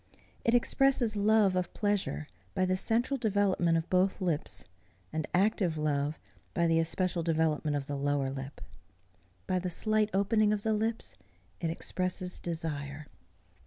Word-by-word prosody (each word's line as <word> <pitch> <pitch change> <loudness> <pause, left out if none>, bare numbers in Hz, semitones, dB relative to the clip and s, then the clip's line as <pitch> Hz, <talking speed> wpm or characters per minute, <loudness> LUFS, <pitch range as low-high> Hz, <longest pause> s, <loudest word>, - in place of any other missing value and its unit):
It 230 - +3
expresses 245 -2 +3
love 205 -2 +4
of 180 -1 -2
pleasure 200 - 0 0.3
by 185 - +2
the 185 0 +1
central 235 +8 +1
development 195 -6 +2
of 165 - -2
both 185 +1 +2
lips, 170 -5 -2 0.5
and 155 -1 -2
active 185 -3 +2
love 150 0 0 0.4
by 170 - +2
the 165 -1 +3
especial 175 +2 0
development 155 -2 +1
of 140 - -4
the 145 - -4
lower 140 -1 0
lip. 135 +1 -7 0.8
By 185 -1 0
the 180 0 -3
slight 215 +4 +1
opening 210 +2 +3
of 205 -1 -2
the 220 - +1
lips, 220 - -2 0.4
it 165 - -1
expresses 180 +2 -2
desire. 155 -3 -4
180 Hz, 145 wpm, -30 LUFS, 155-210 Hz, 0.8 s, love